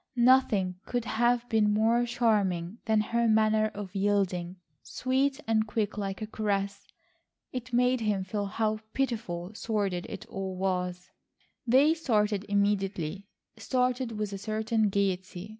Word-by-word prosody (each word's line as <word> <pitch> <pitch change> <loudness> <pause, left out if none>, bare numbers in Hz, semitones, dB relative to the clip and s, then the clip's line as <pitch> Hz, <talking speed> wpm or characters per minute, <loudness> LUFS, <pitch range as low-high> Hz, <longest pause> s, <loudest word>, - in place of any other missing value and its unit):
Nothing 235 -7 +3
could 245 -2 -2
have 240 +1 +1
been 220 -3 +3
more 225 +3 +2
charming 210 -5 0
than 220 -1 +3
her 235 +2 +1
manner 215 0 +3
of 200 -2 -6
yielding, 190 -3 0 0.3
sweet 270 +2 0
and 220 -1 +1
quick 215 -1 -1
like 200 0 -4
a - - -2
caress. 200 -2 -2 0.6
It 255 -1 -6
made 250 +1 +2
him 210 -3 0
feel 200 +2 -3
how 215 +1 -1
pitiful 215 -8 -2
sordid 200 -5 -2
it - - -7
all 190 -1 -5
was. 180 -1 -2 0.6
They 275 +6 +5
started 210 -9 0
immediately, 200 -3 0 0.3
started 250 -2 0
with 210 -1 -3
a 195 - -5
certain 220 +1 0
gaiety. 190 -1 -2
215 Hz, 135 wpm, -29 LUFS, 195-235 Hz, 0.6 s, They